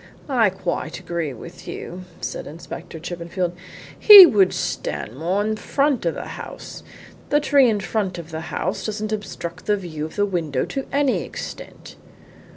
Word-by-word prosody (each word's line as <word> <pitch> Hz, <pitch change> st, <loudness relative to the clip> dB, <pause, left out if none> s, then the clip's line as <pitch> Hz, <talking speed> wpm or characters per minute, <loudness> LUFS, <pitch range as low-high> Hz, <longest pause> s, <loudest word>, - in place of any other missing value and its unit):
"I 235 Hz, -6 st, +4 dB
quite 175 Hz, -4 st, -4 dB
agree 170 Hz, -4 st, -3 dB
with 170 Hz, +8 st, -11 dB
you," 185 Hz, +1 st, -7 dB, 0.2 s
said -, -, -5 dB
Inspector 165 Hz, +2 st, -9 dB
Chippenfield. 175 Hz, +1 st, -3 dB, 0.5 s
"He 410 Hz, -3 st, +12 dB
would 200 Hz, -, +4 dB
stand 110 Hz, -, -3 dB
more 180 Hz, +8 st, 0 dB
in 215 Hz, +1 st, 0 dB
the 215 Hz, -, -7 dB
front 275 Hz, -, +1 dB
of 165 Hz, -, 0 dB
the -, -, -6 dB
house. -, -, -9 dB, 0.5 s
The 295 Hz, -, +4 dB
tree 280 Hz, -4 st, +4 dB
in 210 Hz, -2 st, 0 dB
front 195 Hz, -3 st, -2 dB
of 170 Hz, -1 st, -9 dB
the 160 Hz, 0 st, -4 dB
house 185 Hz, -, -3 dB
doesn't 215 Hz, 0 st, -3 dB
obstruct 180 Hz, -4 st, -6 dB
the 210 Hz, -1 st, +3 dB
view 165 Hz, -6 st, -6 dB
of 160 Hz, -, -9 dB
the 205 Hz, -, +2 dB
window 165 Hz, -9 st, -1 dB
to 270 Hz, -1 st, -5 dB
any 280 Hz, -2 st, +1 dB
extent." -, -, -9 dB
185 Hz, 165 wpm, -22 LUFS, 170-215 Hz, 0.5 s, He